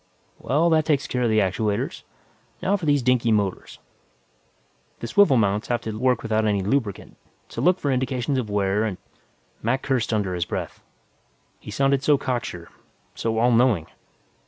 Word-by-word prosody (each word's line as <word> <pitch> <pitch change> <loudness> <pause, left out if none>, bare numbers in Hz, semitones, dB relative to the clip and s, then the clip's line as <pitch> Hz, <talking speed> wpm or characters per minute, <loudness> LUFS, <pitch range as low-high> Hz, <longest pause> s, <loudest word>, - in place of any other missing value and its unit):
"Well, 160 +5 +1
that 155 -1 +3
takes 145 -3 +1
care 125 - -2
of 120 - +2
the 110 - +2
actuators. 105 +1 0 0.6
Now 195 +2 +2
for 180 -6 -4
these 145 -3 +3
dinky 120 -2 +2
motors. 100 -3 -1 1.2
The - - -5
swivel 135 - +4
mounts 105 -1 +1
have 120 -1 -1
to 110 -1 -5
work 125 +1 +1
without 110 -1 0
any 100 -3 +1
lubricant, 105 -1 -2 0.3
so - - -5
look 180 +1 +3
for 140 - -1
indications 130 0 -1
of 115 -4 -4
wear 100 +1 +1
and 105 -5 -2 0.4
" - - -39
Mac 130 +4 0
cursed 125 -4 0
under 100 -4 0
his 85 -1 -1
breath. - - -5 0.8
He - - -12
sounded 135 +5 +1
so 145 0 +3
cocksure, 120 -11 -4 0.4
so 115 -1 -2
all 120 +2 +3
knowing. 115 -8 +3
120 Hz, 170 wpm, -23 LUFS, 105-135 Hz, 1.2 s, swivel